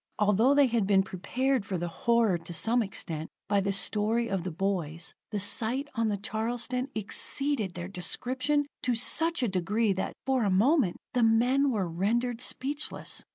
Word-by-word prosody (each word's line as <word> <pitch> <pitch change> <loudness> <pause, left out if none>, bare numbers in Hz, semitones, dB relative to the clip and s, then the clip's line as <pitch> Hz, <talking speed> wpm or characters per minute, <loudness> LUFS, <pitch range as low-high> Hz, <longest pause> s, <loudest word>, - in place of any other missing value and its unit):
Although 215 +6 +4
they 285 -1 +6
had 230 -5 +1
been 195 -1 +4
prepared 245 +7 -1
for 190 -2 -3
the 175 +1 -3
horror 225 0 +2
to 175 - -8
some 230 +8 +2
extent 165 -6 -5 0.2
by 200 +1 +2
the 195 +1 0
story 215 +4 0
of 195 -2 -1
the 185 - -4
boys, 170 -3 -2 0.2
the 210 - -3
sight 235 +7 +1
on 230 -3 0
the 205 -1 0
Charleston 240 +5 -2
exceeded 220 0 -1
their 175 0 -5
description 255 +10 -1 0.2
to 250 -1 +1
such 325 +6 +1
a - - +2
degree 200 +3 +1
that, 190 - -3
for 265 -1 +1
the 210 - +2
moment, 215 - +3 0.2
the 245 - +2
men 245 +5 +3
were 205 -7 0
rendered 230 +8 -1
speechless. 285 +4 -2
220 Hz, 170 wpm, -29 LUFS, 190-250 Hz, 0.2 s, they